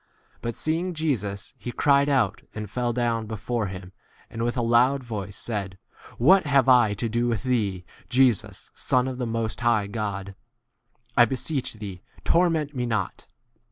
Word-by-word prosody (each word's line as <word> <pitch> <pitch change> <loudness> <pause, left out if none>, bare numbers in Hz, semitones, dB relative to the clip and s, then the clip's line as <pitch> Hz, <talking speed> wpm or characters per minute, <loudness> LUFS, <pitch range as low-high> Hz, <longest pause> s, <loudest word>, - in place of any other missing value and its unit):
But 115 -1 -3
seeing 170 +3 -1
Jesus, 105 -11 -2
he 120 - -5
cried 140 +2 +3
out, 125 -7 +1
and 105 -1 -4
fell 120 +4 -1
down 115 -2 -1
before 110 +1 -2
him, 95 0 -8 0.4
and 115 - -5
with 120 +2 -1
a 120 - +1
loud 125 +4 +3
voice 105 -4 -6
said, 100 -5 -3 0.4
What 180 +7 +5
have 140 -3 +4
I 120 -5 +5
to 115 +3 -2
do 120 +2 0
with 115 -4 -1
thee, 105 -8 0 0.2
Jesus, 125 -4 +1
Son 125 0 +1
of 130 -1 -5
the 125 - -1
Most 115 -1 -2
High 115 -4 +2
God? 100 -2 -4 0.8
I 120 - +7
beseech 130 +1 -2
thee, 100 -4 -7 0.2
torment 165 -4 +2
me 125 -1 -1
not. 110 -5 -3
120 Hz, 160 wpm, -25 LUFS, 105-130 Hz, 0.8 s, I